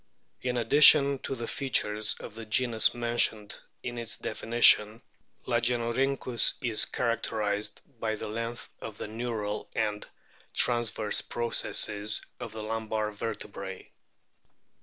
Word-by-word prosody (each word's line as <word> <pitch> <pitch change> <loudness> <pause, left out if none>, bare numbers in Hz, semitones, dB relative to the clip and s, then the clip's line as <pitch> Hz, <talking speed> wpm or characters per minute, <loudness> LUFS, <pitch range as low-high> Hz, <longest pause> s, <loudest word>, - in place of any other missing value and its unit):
In 125 -1 -2
addition 140 +2 +7
to 135 - -5
the 120 -2 -5
features 110 -6 0
of 110 - -9
the 115 +1 -8
genus 115 0 +2
mentioned 115 -3 +1 0.3
in 120 -1 -5
its 115 -1 -4
definition, 115 0 +3 0.4
Lagenorhynchus 120 +1 +1
is 115 -4 +2
characterised 110 -3 -2 0.2
by 110 -1 -2
the - - -6
length 115 +2 -5
of - - -8
the - - -6
neural 110 -2 -4
and 105 -1 -2 0.5
transverse 120 -3 +1
processes 110 -2 0
of - - -7
the 110 -1 -7
lumbar 110 -1 -3
vertebrae. 100 -3 -7
115 Hz, 115 wpm, -28 LUFS, 105-120 Hz, 0.5 s, addition